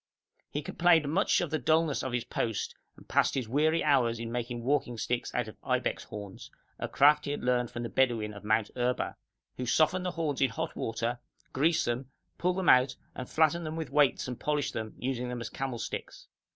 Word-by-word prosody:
He 145 Hz, -, -3 dB
complained 165 Hz, -1 st, +3 dB
much 195 Hz, +4 st, +3 dB
of 175 Hz, -, -2 dB
the 155 Hz, -, 0 dB
dulness 155 Hz, +2 st, +2 dB
of 130 Hz, -, -3 dB
his 120 Hz, -1 st, -1 dB
post, 115 Hz, -3 st, -2 dB, 0.2 s
and -, -, -16 dB
passed -, -, +2 dB
his 130 Hz, -4 st, -1 dB
weary 155 Hz, +6 st, +2 dB
hours 125 Hz, -6 st, +3 dB
in 115 Hz, 0 st, -5 dB
making 120 Hz, 0 st, -3 dB
walking 130 Hz, -2 st, 0 dB
sticks 120 Hz, +2 st, -2 dB
out 125 Hz, -2 st, 0 dB
of 110 Hz, -, -10 dB
ibex -, -, -1 dB
horns, 100 Hz, -2 st, -8 dB, 0.3 s
a -, -, -2 dB
craft 150 Hz, +2 st, +5 dB
he -, -, -3 dB
had 145 Hz, -, -3 dB
learnt 125 Hz, -1 st, +1 dB
from 120 Hz, -, -5 dB
the 120 Hz, -, -3 dB
Bedouin 115 Hz, -5 st, +1 dB
of 100 Hz, -, -10 dB
Mount 110 Hz, 0 st, +1 dB
Erba, 125 Hz, 0 st, -1 dB, 0.4 s
who 125 Hz, -, -3 dB
soften 155 Hz, +8 st, +3 dB
the 180 Hz, -, -1 dB
horns 160 Hz, -6 st, -2 dB
in 135 Hz, -, +4 dB
hot 115 Hz, -, -4 dB
water, 115 Hz, +2 st, -2 dB, 0.3 s
grease 155 Hz, +5 st, +2 dB
them, 120 Hz, +2 st, -2 dB, 0.3 s
pull 180 Hz, +1 st, +1 dB
them 190 Hz, -1 st, -2 dB
out 125 Hz, 0 st, +6 dB, 0.2 s
and 130 Hz, -, -7 dB
flatten 160 Hz, +2 st, +2 dB
them 155 Hz, 0 st, -4 dB
with 160 Hz, -5 st, -4 dB
weights 145 Hz, -4 st, +3 dB
and 125 Hz, -2 st, -5 dB
polish 150 Hz, -1 st, 0 dB
them, 110 Hz, -1 st, -5 dB
using 125 Hz, -1 st, -2 dB
them 125 Hz, -1 st, -4 dB
as 115 Hz, -, -5 dB
camel 135 Hz, -3 st, -3 dB
sticks. -, -, -6 dB
130 Hz, 210 wpm, -30 LUFS, 120-150 Hz, 0.4 s, out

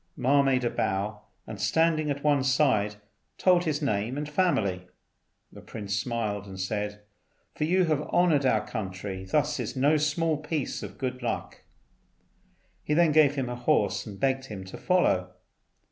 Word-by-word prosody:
Ma 140 Hz, +3 st, +4 dB
made 135 Hz, -2 st, +2 dB
a 120 Hz, -, +1 dB
bow, 105 Hz, +2 st, -2 dB, 0.2 s
and 105 Hz, -3 st, -8 dB
standing 155 Hz, +7 st, +2 dB
at 140 Hz, 0 st, -3 dB
one 145 Hz, -3 st, +3 dB
side 120 Hz, -6 st, +2 dB, 0.4 s
told 180 Hz, -1 st, +3 dB
his 155 Hz, -1 st, -1 dB
name 115 Hz, 0 st, -1 dB
and 150 Hz, 0 st, -3 dB
family. 110 Hz, -, 0 dB, 0.6 s
The -, -, -12 dB
prince 100 Hz, -2 st, -5 dB
smiled, 105 Hz, -2 st, -2 dB
and 95 Hz, -1 st, -9 dB
said, 105 Hz, +2 st, -3 dB, 0.5 s
"For 150 Hz, -, -1 dB
you 185 Hz, +3 st, +3 dB
to 170 Hz, -, -1 dB
have 150 Hz, -2 st, +1 dB
honoured 165 Hz, -5 st, +3 dB
our 120 Hz, -5 st, +2 dB
country 95 Hz, -3 st, -5 dB
thus 150 Hz, +8 st, 0 dB
is -, -, -4 dB
no 145 Hz, +4 st, +3 dB
small 155 Hz, +1 st, +1 dB
piece 150 Hz, -1 st, -3 dB
of -, -, -8 dB
good 125 Hz, -1 st, -4 dB
luck." 120 Hz, -, -4 dB, 1.2 s
He 150 Hz, -, -1 dB
then 170 Hz, -1 st, +4 dB
gave 150 Hz, -2 st, +5 dB
him 135 Hz, -3 st, -2 dB
a 125 Hz, -, -4 dB
horse 105 Hz, -4 st, +1 dB
and 100 Hz, -2 st, -9 dB
begged 135 Hz, -1 st, 0 dB
him 105 Hz, -7 st, -7 dB
to 95 Hz, -, -9 dB
follow. 95 Hz, -, +1 dB
130 Hz, 170 wpm, -27 LUFS, 105-150 Hz, 1.2 s, gave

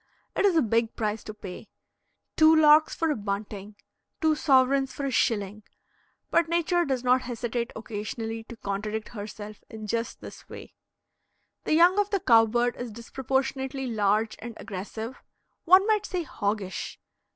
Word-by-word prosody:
It -, -, +2 dB
is 385 Hz, -4 st, +4 dB
a 315 Hz, -, +4 dB
big 230 Hz, 0 st, 0 dB
price 215 Hz, -1 st, -2 dB
to 215 Hz, -, -6 dB
pay 200 Hz, 0 st, -9 dB, 0.7 s
two 315 Hz, 0 st, +6 dB
larks 310 Hz, 0 st, +6 dB
for 325 Hz, -1 st, 0 dB
a -, -, 0 dB
bunting 205 Hz, 0 st, -5 dB, 0.4 s
two 315 Hz, -3 st, +3 dB
sovereigns 270 Hz, -2 st, +3 dB
for 280 Hz, +2 st, -5 dB
a 275 Hz, -, -1 dB
shilling; 210 Hz, -3 st, 0 dB, 0.7 s
but 335 Hz, -1 st, +3 dB
Nature 345 Hz, +1 st, +1 dB
does 260 Hz, -3 st, -1 dB
not 255 Hz, +1 st, +4 dB
hesitate 240 Hz, -1 st, -3 dB
occasionally 225 Hz, +1 st, -5 dB
to 235 Hz, -, -11 dB
contradict 210 Hz, +2 st, -4 dB
herself 210 Hz, -1 st, -8 dB
in 220 Hz, -1 st, -8 dB
just 230 Hz, +2 st, -3 dB
this -, -, -12 dB
way. -, -, -10 dB, 0.9 s
The 310 Hz, -, +2 dB
young 355 Hz, +4 st, +5 dB
of 410 Hz, 0 st, +1 dB
the 400 Hz, -2 st, 0 dB
cow 230 Hz, -10 st, +5 dB
bird 240 Hz, +2 st, 0 dB
is 245 Hz, -1 st, -5 dB
disproportionately 265 Hz, +3 st, -2 dB
large 215 Hz, -1 st, +1 dB
and 235 Hz, -1 st, -8 dB
aggressive, 220 Hz, +5 st, -7 dB, 0.4 s
one 370 Hz, +3 st, +7 dB
might 425 Hz, -1 st, +1 dB
say 365 Hz, -2 st, -2 dB
hoggish. 205 Hz, -, -3 dB
235 Hz, 155 wpm, -27 LUFS, 215-300 Hz, 0.9 s, one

